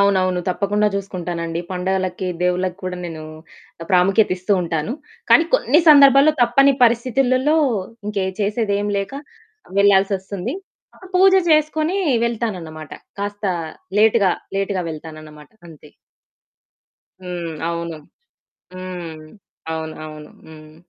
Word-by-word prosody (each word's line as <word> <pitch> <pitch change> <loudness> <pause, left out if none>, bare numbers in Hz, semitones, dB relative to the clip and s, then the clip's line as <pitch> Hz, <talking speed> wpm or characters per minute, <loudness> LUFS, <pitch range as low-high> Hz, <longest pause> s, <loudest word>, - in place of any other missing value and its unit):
అవునవును. 185 -2 +2
తప్పకుండా 205 +3 0
జూసుకుంటానండి. 175 -4 -4
పండగలకి, 185 0 -2 0.2
దేవుళ్ళకి 180 0 0
కూడా 185 0 -4
నేను 160 -2 -7 0.7
ప్రాముఖ్యత 195 +4 +3
ఇస్తూ 185 +3 -1
ఉంటాను. 165 +4 -2 0.4
కానీ, 335 - +7
కొన్ని 325 -9 +3
సందర్భాల్లో 280 0 +7
తప్పని 275 +4 +4
పరిస్థితులలో 255 +4 +2 0.5
ఇంకే 200 -2 -1 0.2
చేసేదేం 205 -1 0
లేక 195 +4 -4 0.7
వెళ్ళాల్సి 200 0 +4
ఒస్తుంది. 195 - -5 0.6
పూజ 380 +1 +6 0.2
జేసుకొని 310 +3 +2 0.3
వెళ్తానన్నమాట. 185 -10 -4 0.3
కాస్త 205 +1 -5 0.5
లేట్‌గా, 215 -3 +4 0.3
లేట్‌గా 195 -1 -1
వెళ్తానన్నమాట 155 -1 -11 0.2
అంతే. 155 -2 -15 1.3
హ్మ్. 175 -2 -5 0.2
అవును. 170 -1 -4 0.8
హ్మ్. 180 -3 -7 0.5
అవును 160 -1 -5
అవును. 150 -1 -11 0.2
హ్మ్. 155 -1 -14
190 Hz, 100 wpm, -20 LUFS, 170-225 Hz, 1.3 s, కానీ